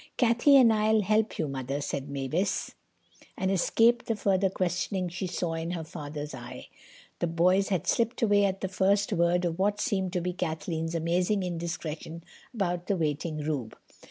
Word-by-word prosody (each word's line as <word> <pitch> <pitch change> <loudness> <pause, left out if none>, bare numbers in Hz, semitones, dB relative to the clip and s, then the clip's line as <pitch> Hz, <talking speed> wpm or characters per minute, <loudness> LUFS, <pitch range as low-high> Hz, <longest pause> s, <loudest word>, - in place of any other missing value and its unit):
"Cathay 240 +4 +4
and 245 -4 +7
I'll 215 0 +3
help 215 +2 +1
you, 155 - -1
Mother," 135 0 -3
said 140 -1 -4
Mavis, 160 +9 -2 0.6
and 190 0 0
escaped 230 +5 +3
the 225 - 0
further 195 -2 +2
questioning 185 0 -1
she 175 +2 -4
saw 175 -1 -2
in 165 +1 -3
her 175 -2 -3
father's 150 -2 -7
eye. 125 -2 -9 0.5
The 175 - 0
boys 180 +4 +2
had 185 -4 0
slipped 235 +1 0
away 205 -2 +4
at 195 -1 -1
the 190 - -1
first 200 +3 +1
word 175 0 +2
of 170 0 -2
what 205 +2 +1
seemed 190 -3 0
to 180 - +1
be 180 +1 -2
Kathleen's 165 -1 -3
amazing 180 +4 +1
indiscretion 165 -2 -5 0.3
about 180 -6 -2
the 200 - +1
waiting 155 0 -2
Rube. 140 -7 -3
180 Hz, 170 wpm, -28 LUFS, 160-200 Hz, 0.6 s, and